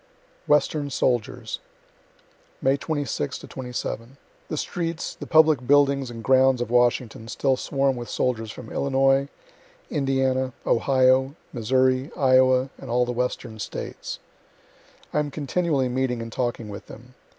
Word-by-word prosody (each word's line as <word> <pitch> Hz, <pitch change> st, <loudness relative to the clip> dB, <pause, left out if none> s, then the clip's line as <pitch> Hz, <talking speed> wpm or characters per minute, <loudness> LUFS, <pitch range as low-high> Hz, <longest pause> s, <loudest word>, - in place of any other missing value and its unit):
WESTERN 150 Hz, 0 st, +2 dB
SOLDIERS 120 Hz, -4 st, -1 dB, 1.0 s
May 135 Hz, +1 st, +3 dB
26 145 Hz, -, -3 dB, 0.3 s
7. 120 Hz, +1 st, -5 dB, 0.3 s
The 155 Hz, -, -4 dB
streets, 165 Hz, +1 st, -3 dB
the -, -, -9 dB
public 155 Hz, -6 st, +4 dB
buildings 140 Hz, -2 st, +4 dB
and 115 Hz, -1 st, -8 dB
grounds 130 Hz, 0 st, +4 dB
of 120 Hz, -1 st, -3 dB
Washington, 120 Hz, -2 st, +1 dB
still 130 Hz, +3 st, +1 dB
swarm 135 Hz, +1 st, 0 dB
with 120 Hz, -2 st, -6 dB
soldiers 115 Hz, -3 st, -1 dB
from 110 Hz, +1 st, -9 dB
Illinois, 135 Hz, 0 st, +2 dB, 0.6 s
Indiana, 135 Hz, -2 st, +1 dB
Ohio, 130 Hz, +2 st, +3 dB, 0.2 s
Missouri, 130 Hz, +3 st, +2 dB
Iowa, 130 Hz, -1 st, +4 dB
and -, -, -9 dB
all 125 Hz, +1 st, +2 dB
the 120 Hz, -, -3 dB
Western 120 Hz, -2 st, -3 dB
States. -, -, -6 dB, 1.0 s
I -, -, +2 dB
am 150 Hz, -1 st, -1 dB
continually 145 Hz, -1 st, 0 dB
meeting 125 Hz, -1 st, -1 dB
and 115 Hz, -, -8 dB
talking 120 Hz, -3 st, -2 dB
with 100 Hz, 0 st, -8 dB
them. 125 Hz, +2 st, -13 dB
130 Hz, 130 wpm, -24 LUFS, 120-140 Hz, 1.0 s, public